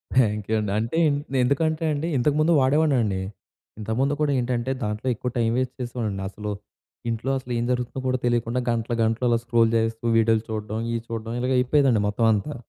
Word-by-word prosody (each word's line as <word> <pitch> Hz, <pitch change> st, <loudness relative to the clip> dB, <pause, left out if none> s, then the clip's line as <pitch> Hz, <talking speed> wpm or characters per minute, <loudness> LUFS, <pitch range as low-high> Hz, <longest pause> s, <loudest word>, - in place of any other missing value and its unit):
Thank you 105 Hz, -3 st, +2 dB
అండి. 105 Hz, -2 st, -2 dB
అంటే, 115 Hz, +9 st, -1 dB, 0.3 s
నే 135 Hz, -, 0 dB
ఎందుకంటే 155 Hz, +4 st, 0 dB
అండి 145 Hz, +3 st, -2 dB
ఇంతకముందు 150 Hz, +5 st, +2 dB
వాడేవాడినండి. 130 Hz, -8 st, +2 dB, 0.6 s
ఇంతకుముందు 115 Hz, +6 st, 0 dB
కూడా 145 Hz, -1 st, +2 dB
ఏంటంటే, 125 Hz, +1 st, -1 dB
దాంట్లో 105 Hz, +4 st, -3 dB
ఎక్కువ 125 Hz, -, -3 dB
టైం 115 Hz, -1 st, +2 dB
వేస్ట్ 130 Hz, 0 st, -1 dB
చేసేవాడిని. 110 Hz, -5 st, -3 dB
అసలు, 105 Hz, +1 st, -6 dB, 0.6 s
ఇంట్లో 115 Hz, +4 st, -2 dB
అసలు 125 Hz, -1 st, -6 dB
ఏం 120 Hz, -, 0 dB
జరుగుతుందో 125 Hz, +1 st, -2 dB
కూడా 130 Hz, 0 st, 0 dB
తెలియకుండా 120 Hz, +1 st, 0 dB
గంటలు, 115 Hz, 0 st, -1 dB
గంటలు 115 Hz, +3 st, 0 dB
అలా 115 Hz, -, +3 dB
స్క్రోల్ 115 Hz, -2 st, +3 dB
చేస్తూ 115 Hz, 0 st, -1 dB
వీడియోలు 115 Hz, 0 st, +3 dB
చూడడం, 110 Hz, 0 st, -3 dB
ఇయి 115 Hz, -1 st, -1 dB
చూడడం 115 Hz, 0 st, -5 dB
ఇలాగ 125 Hz, +1 st, 0 dB
అయిపోయేదండి 130 Hz, -3 st, +3 dB
మొత్తం 105 Hz, +3 st, 0 dB
అంతా. 125 Hz, +9 st, -2 dB
120 Hz, 170 wpm, -24 LUFS, 110-130 Hz, 0.6 s, అలా